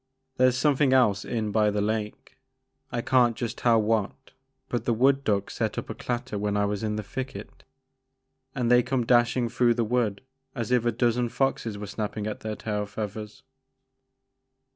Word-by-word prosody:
There 130 Hz, 0 st, +5 dB
's 125 Hz, -, -3 dB
something 140 Hz, -1 st, +3 dB
else 105 Hz, -7 st, +3 dB
in 110 Hz, -3 st, -2 dB
by 105 Hz, 0 st, +3 dB
the 105 Hz, 0 st, -1 dB
lake, 105 Hz, 0 st, -3 dB, 0.3 s
— -, -, -44 dB
I 120 Hz, -, -1 dB
can't 125 Hz, -3 st, +3 dB
just 120 Hz, -1 st, -4 dB
tell 115 Hz, -2 st, +4 dB
what, 110 Hz, +4 st, -1 dB, 0.4 s
but 120 Hz, -2 st, -3 dB
the 120 Hz, -, +1 dB
wood 135 Hz, +4 st, +3 dB
duck 100 Hz, -4 st, 0 dB
set -, -, -2 dB
up -, -, -4 dB
a -, -, -3 dB
clatter 120 Hz, -4 st, -4 dB
when 105 Hz, 0 st, -1 dB
I 105 Hz, -, +2 dB
was 100 Hz, 0 st, -2 dB
in 105 Hz, -1 st, -1 dB
the 105 Hz, -, -3 dB
thicket 110 Hz, -1 st, -7 dB, 0.9 s
and 125 Hz, -3 st, 0 dB
they 125 Hz, 0 st, +7 dB
come 125 Hz, -1 st, -1 dB
dashing 120 Hz, 0 st, +3 dB
through 120 Hz, 0 st, +2 dB
the 120 Hz, -, +1 dB
wood 110 Hz, -3 st, 0 dB, 0.3 s
as 115 Hz, -2 st, -3 dB
if 125 Hz, -2 st, +3 dB
a 120 Hz, -, +3 dB
dozen 120 Hz, +1 st, +1 dB
foxes 115 Hz, -5 st, -1 dB
was 100 Hz, -1 st, -7 dB
snappin' 105 Hz, 0 st, -4 dB
at 105 Hz, -, -4 dB
their 110 Hz, -1 st, -4 dB
tail 105 Hz, -2 st, -3 dB
feathers." 105 Hz, 0 st, -6 dB
115 Hz, 185 wpm, -26 LUFS, 105-125 Hz, 0.9 s, they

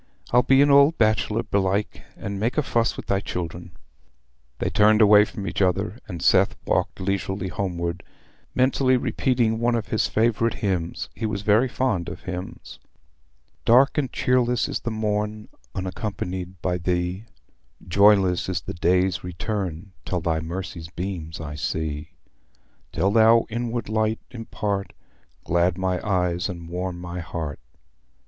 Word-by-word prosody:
"I'll 125 Hz, -, +6 dB
be 135 Hz, +3 st, +5 dB
an 145 Hz, -, +3 dB
old 140 Hz, +3 st, +6 dB
bachelor, 110 Hz, 0 st, +2 dB
belike, 100 Hz, -1 st, -1 dB, 0.2 s
and 100 Hz, 0 st, -5 dB
make 115 Hz, +7 st, -1 dB
a 150 Hz, -, +3 dB
fuss 115 Hz, -3 st, 0 dB
wi' -, -, -5 dB
thy 100 Hz, -, +1 dB
children." 85 Hz, -1 st, -5 dB, 0.8 s
They -, -, -2 dB
turned 105 Hz, +1 st, +5 dB
away 105 Hz, -1 st, +7 dB
from 100 Hz, -2 st, -7 dB
each -, -, -2 dB
other, 95 Hz, +3 st, 0 dB
and 85 Hz, -5 st, -6 dB
Seth -, -, +4 dB
walked -, -, 0 dB
leisurely 95 Hz, 0 st, -2 dB
homeward, 85 Hz, -2 st, -3 dB, 0.5 s
mentally 130 Hz, 0 st, +3 dB
repeating 120 Hz, -3 st, 0 dB
one 120 Hz, +1 st, +2 dB
of 115 Hz, -1 st, -3 dB
his 110 Hz, -, +1 dB
favourite 115 Hz, +1 st, +1 dB
hymns—he 95 Hz, +2 st, -3 dB
was 100 Hz, -2 st, -3 dB
very 110 Hz, +5 st, +4 dB
fond 120 Hz, -9 st, -1 dB
of -, -, -8 dB
hymns: 90 Hz, 0 st, -7 dB, 0.8 s
"Dark 130 Hz, +5 st, +5 dB
and 140 Hz, -4 st, -1 dB
cheerless 125 Hz, -1 st, +1 dB
is -, -, -2 dB
the -, -, -4 dB
morn 105 Hz, -1 st, -2 dB, 0.3 s
Unaccompanied 95 Hz, -1 st, -4 dB
by 90 Hz, -1 st, 0 dB
thee: 90 Hz, +3 st, -1 dB, 0.6 s
Joyless 95 Hz, -1 st, +4 dB
is 90 Hz, -2 st, -1 dB
the -, -, -6 dB
day's 90 Hz, +1 st, +1 dB
return 95 Hz, -1 st, -4 dB
Till 90 Hz, -, -2 dB
thy 80 Hz, -1 st, 0 dB
mercy's 85 Hz, 0 st, -6 dB
beams 85 Hz, -2 st, -5 dB
I 75 Hz, -2 st, -6 dB
see: 75 Hz, 0 st, -4 dB, 0.8 s
Till 100 Hz, -, +1 dB
thou 115 Hz, +1 st, +5 dB
inward 120 Hz, 0 st, -3 dB
light 110 Hz, +1 st, 0 dB
impart, 105 Hz, -4 st, -3 dB, 0.5 s
Glad 85 Hz, +1 st, +1 dB
my 95 Hz, -1 st, -1 dB
eyes 90 Hz, -2 st, 0 dB
and 85 Hz, -2 st, -7 dB
warm 90 Hz, 0 st, -4 dB
my 90 Hz, 0 st, -6 dB
heart. 80 Hz, -4 st, -5 dB
100 Hz, 145 wpm, -24 LUFS, 90-110 Hz, 0.8 s, away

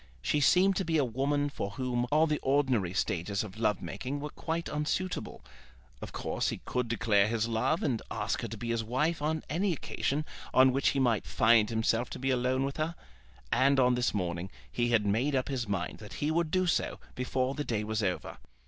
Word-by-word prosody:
She 150 Hz, -, +1 dB
seemed 185 Hz, +6 st, +4 dB
to 195 Hz, -, +1 dB
be 165 Hz, -2 st, +1 dB
a 145 Hz, -, +3 dB
woman 140 Hz, +4 st, 0 dB
for 120 Hz, -8 st, -4 dB
whom 125 Hz, -1 st, -1 dB
all 155 Hz, +2 st, +5 dB
the 150 Hz, -2 st, 0 dB
ordinary 130 Hz, -9 st, +1 dB
stages 95 Hz, +1 st, -1 dB
of 105 Hz, 0 st, -9 dB
love 105 Hz, -3 st, +1 dB
making 105 Hz, +11 st, -4 dB
were 150 Hz, +1 st, -5 dB
quite 165 Hz, +1 st, -3 dB
unsuitable, 155 Hz, +5 st, -3 dB, 0.6 s
Of -, -, -6 dB
course -, -, -2 dB
he -, -, -4 dB
could 125 Hz, -1 st, -1 dB
declare 105 Hz, -3 st, +3 dB
his 115 Hz, 0 st, 0 dB
love 115 Hz, +8 st, 0 dB
and 120 Hz, -6 st, 0 dB
ask -, -, -2 dB
her -, -, -3 dB
to 110 Hz, +1 st, -7 dB
be 115 Hz, +3 st, -5 dB
his 115 Hz, -1 st, 0 dB
wife 145 Hz, +8 st, 0 dB
on 155 Hz, +1 st, -1 dB
any 175 Hz, +6 st, 0 dB
occasion 150 Hz, 0 st, -2 dB, 0.3 s
on 130 Hz, 0 st, +7 dB
which 135 Hz, +1 st, +1 dB
he 140 Hz, -, 0 dB
might 120 Hz, -5 st, +1 dB
find 110 Hz, -1 st, +4 dB
himself 115 Hz, +1 st, +1 dB
to -, -, -6 dB
be 135 Hz, +1 st, 0 dB
alone 130 Hz, +1 st, +1 dB
with 140 Hz, -, -4 dB
her. 160 Hz, +2 st, -1 dB, 0.6 s
And 135 Hz, +3 st, +4 dB
on 125 Hz, -1 st, +5 dB
this 125 Hz, 0 st, +1 dB
morning 90 Hz, -2 st, -2 dB, 0.2 s
he 120 Hz, 0 st, 0 dB
had 115 Hz, -3 st, +3 dB
made 120 Hz, +8 st, +1 dB
up 130 Hz, +1 st, 0 dB
his 125 Hz, -5 st, -2 dB
mind 95 Hz, -3 st, -3 dB
that 105 Hz, -, -10 dB
he 150 Hz, +2 st, -1 dB
would 170 Hz, 0 st, +1 dB
do 185 Hz, +2 st, +2 dB
so 175 Hz, -, 0 dB
before 130 Hz, +1 st, -1 dB
the 150 Hz, -, -3 dB
day 110 Hz, -6 st, -1 dB
was 110 Hz, +1 st, -1 dB
over. 90 Hz, -3 st, -2 dB
125 Hz, 210 wpm, -30 LUFS, 110-145 Hz, 0.6 s, on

